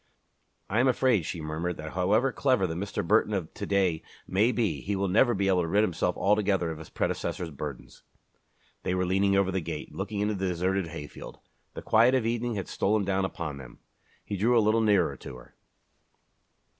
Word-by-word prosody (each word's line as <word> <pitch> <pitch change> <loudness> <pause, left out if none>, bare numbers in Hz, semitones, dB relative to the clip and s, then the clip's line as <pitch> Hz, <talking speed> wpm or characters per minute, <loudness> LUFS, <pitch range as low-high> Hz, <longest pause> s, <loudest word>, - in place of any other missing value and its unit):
"I 110 - 0
am 130 - +4
afraid," 125 - +2
she 85 - -4
murmured, 80 +3 -3
"that 80 0 -7
however 105 +9 +2
clever 130 -7 +2
the 80 - -2
Mr. 90 -1 -4
Burton 105 +1 +3
of 85 -5 -4
to - - -6
day 95 -5 +1 0.3
may 105 +6 +3
be, 100 - -1
he 100 - -2
will 100 0 0
never 115 +5 +3
be 100 0 0
able 95 -2 +3
to 85 - -2
rid 100 +5 +3
himself 90 -2 -1
altogether 100 -4 +1
of 80 - -7
his 80 - -11
predecessor's 85 -2 -2
burdens." 70 -2 -8 0.8
They 90 - -1
were 90 0 0
leaning 100 +2 +2
over 95 -1 +2
the 95 0 -1
gate, 80 -2 -6
looking 100 +1 -4
into 105 +1 +1
the 95 -1 -2
deserted 90 +1 0
hayfield. 80 -2 -9 0.4
The - - -7
quiet 120 +4 +4
of 125 -4 +1
evening 120 0 -1
had 95 - -4
stolen 105 0 0
down 95 0 +1
upon 85 -6 -5
them. 65 -3 -12 0.5
He 100 - -4
drew 120 +5 +3
a - - +7
little 110 +1 +3
nearer 100 -6 +3
to 65 - -9
her. - - -15
95 Hz, 200 wpm, -28 LUFS, 85-105 Hz, 0.8 s, a